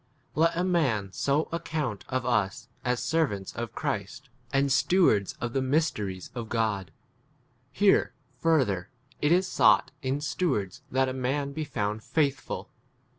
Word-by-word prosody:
IY. 155 - +1
Let 165 0 +3
a 180 - +2
man 135 - +1
so 140 - +1
account 155 -9 -3
of 130 -1 -1
ns 120 0 0
as 125 -1 0
servants' 125 - 0
1 120 - -3
of - - -20
Christ, 110 +7 -3 0.2
and 135 0 +2
stewards 135 - +3
2 - - -26
of 120 - -4
[the] 135 - +1
mysteries 130 - -1
of 120 -3 -5
God. 110 -5 0 0.8
Here, 200 0 +3 0.2
further, 125 - +2 0.3
it 150 - +3
is 185 +2 +4
sought - - +4
1 130 -1 0
in 145 - -2
ste 150 +4 -4
wards 100 - -2
that 130 +1 +2
a 130 - -2
man 140 +2 -1
be 155 - -3
found 105 -7 -2
8 - - -21
faithful. 145 -3 -1
130 Hz, 170 wpm, -28 LUFS, 105-155 Hz, 0.8 s, is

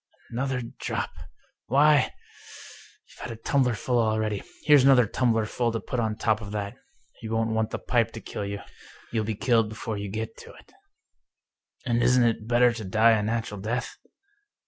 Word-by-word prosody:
" - - -29
Another 125 +1 -2 0.2
drop! - - -3 0.6
Why, 145 +1 +4 1.0
you've - - -19
had - - -6
a - - -6
tumblerful 125 -1 +1
already 110 -2 0
I - - -16 0.2
Here's 145 -3 +6
another 130 -3 +6
tumblerful 115 +1 0
to 115 - -1
put 125 - -4
on 110 -2 0
top 110 0 0
of 105 - -7
that. 100 -1 -3 0.5
You 110 - -6
won't 115 0 0
want 110 0 0
the - - -3
pipe 115 -2 +1
to 115 - -6
kill 100 -2 -5
you 100 0 -5 0.3
— - - -22
^you'll 110 -2 0
be 110 0 -2
killed 115 -1 +2
before 110 -1 -5
you 100 0 -5
get 110 - -4
to - - -12
it." - - -18 0.6
" - - -40
And 120 -1 +1
isn't 125 0 +4
it 115 -2 0
better 120 0 +4
to 115 -1 -6
die 110 +4 +4
a 110 -2 +3
natural 110 -1 -2
death? 115 +5 -3
115 Hz, 190 wpm, -26 LUFS, 110-125 Hz, 1.0 s, Here's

